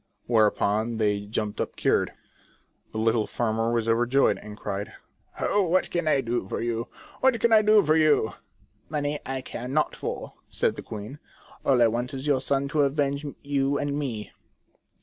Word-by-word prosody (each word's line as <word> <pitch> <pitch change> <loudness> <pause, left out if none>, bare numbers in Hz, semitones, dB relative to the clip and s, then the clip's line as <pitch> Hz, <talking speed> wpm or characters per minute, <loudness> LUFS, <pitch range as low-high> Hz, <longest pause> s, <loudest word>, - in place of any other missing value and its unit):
Whereupon 110 0 +2
they 105 -2 0
jumped 105 0 -2
up - - -4
cured. - - +1 0.8
The - - -6
little 110 0 +2
farmer 115 0 0
was 115 -1 0
overjoyed, 120 +4 +3
and 105 0 -10
cried: 100 -1 -4 0.2
" - - -21
Oh, 205 - +2
what 185 0 +1
can 170 -2 -1
I 145 -3 +3
do 120 0 -1
for - - -3
you? 115 0 -2 0.3
What 260 -3 +3
can 235 0 +3
I 215 - +8
do 215 0 +5
for 155 +1 +3
you 155 -8 +3 0.2
?" - - -36
" - - -40
Money 150 -1 -1
I 135 -1 -2
care 125 -1 -6
not 150 +4 0
for," - - -5 0.2
said - - 0
the - - -6
queen, 110 +7 -8 0.2
" - - -23
all 130 -3 +4
I - - +6
want 120 +4 -2
is 135 +1 -6
your 140 -3 +2
son 140 0 0
to 150 0 +2
avenge 140 0 0 0.2
you 140 0 +1
and 145 0 -1
me." 130 -8 -4
130 Hz, 190 wpm, -26 LUFS, 115-145 Hz, 0.8 s, I